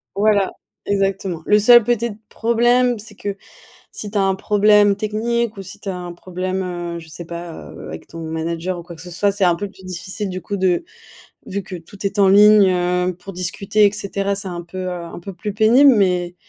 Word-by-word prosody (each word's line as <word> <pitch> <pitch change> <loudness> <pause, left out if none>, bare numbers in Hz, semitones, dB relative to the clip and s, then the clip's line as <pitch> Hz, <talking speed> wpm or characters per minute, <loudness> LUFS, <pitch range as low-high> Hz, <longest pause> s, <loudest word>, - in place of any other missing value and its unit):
Voilà, 205 -1 +2 0.3
exactement. 195 -3 -1
Le 210 0 +4
seul 240 +2 +7
petite 235 -2 -1
problème, 240 +1 +2
c'est 215 0 -10
que, 200 0 -5 0.5
si 210 - -6
tu 210 - -1
as 195 - +3
un 195 0 +2
problème 210 0 +4
technique 220 +2 -1
ou 195 - -6
si 200 +2 -10
tu 200 - -7
as 185 - -2
un 175 -1 -6
problème, 185 +2 -4 0.3
heu, - - -5
je 160 - -14
sais 170 +2 -8
pas, 170 0 -7 0.2
heu, - - -10
avec 80 - -8
ton 165 - -10
manager 165 +3 -3
ou - - -7
quoi 175 - -10
que 165 - -11
ce 180 - -9
soit, 200 +4 +1
c'est 200 -1 +1
un 175 -2 +3
peu 205 +4 -4
plus 190 -1 -17
difficile, 185 +3 -5
du 185 0 -5
coup 200 +4 -4
de 185 - +1 0.6
vu 200 +1 -3
que 185 0 -8
tout 180 +4 -12
est 200 +1 -4
en 195 -1 +5
ligne, 210 +1 +7
heu, 180 0 0
pour 185 +2 -10
discuter 195 +3 +1
et 200 - +1
cetera. 200 -1 -2
C'est 195 -1 -4
un 175 -1 -5
peu, 175 +2 -10
heu, - - -2
un 175 -1 -7
peu 195 +3 -8
plus 205 +3 -5
pénible 245 +7 +6
mais 180 -4 +1
195 Hz, 220 wpm, -20 LUFS, 180-210 Hz, 0.6 s, seul